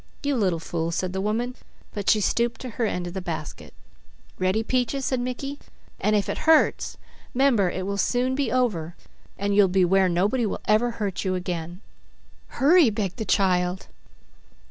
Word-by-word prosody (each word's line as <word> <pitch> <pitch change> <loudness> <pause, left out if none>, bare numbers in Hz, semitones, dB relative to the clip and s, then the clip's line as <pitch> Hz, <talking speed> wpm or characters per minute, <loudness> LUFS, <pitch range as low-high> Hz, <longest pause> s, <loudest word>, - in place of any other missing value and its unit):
"You 285 -1 +1
little 190 -8 +1
fool," 165 0 -3
said 180 +2 -2
the 190 - -2
woman, 235 +5 -1 0.4
but 205 -2 -2
she 215 - +4
stooped 235 +3 0
to 255 - -5
her 225 +1 -1
end 180 -3 -3
of 175 - -6
the 190 - -4
basket. 165 -4 -6 0.7
"Ready, 185 +4 +1
Peaches," 255 +3 -1
said 260 - 0
Mickey, 255 +3 -4 0.4
"and 215 - +2
if 205 - +1
it - - -3
hurts, 320 - +3 0.4
'member 245 -8 +3
it 185 +1 -4
will 200 0 -3
soon 250 +4 +1
be 275 +1 -1
over, 195 -11 0 0.4
and 200 0 -1
you'll 205 -1 +6
be 185 0 +3
where 190 +1 +3
nobody 200 +8 +1
will - - -4
ever 215 +3 +3
hurt 205 -5 -3
you 185 -1 0
again." 175 0 -4 0.7
"Hurry!" 310 0 +4
begged 205 -2 -3
the 220 - -3
child. 185 -2 +1
205 Hz, 175 wpm, -25 LUFS, 185-245 Hz, 0.7 s, you'll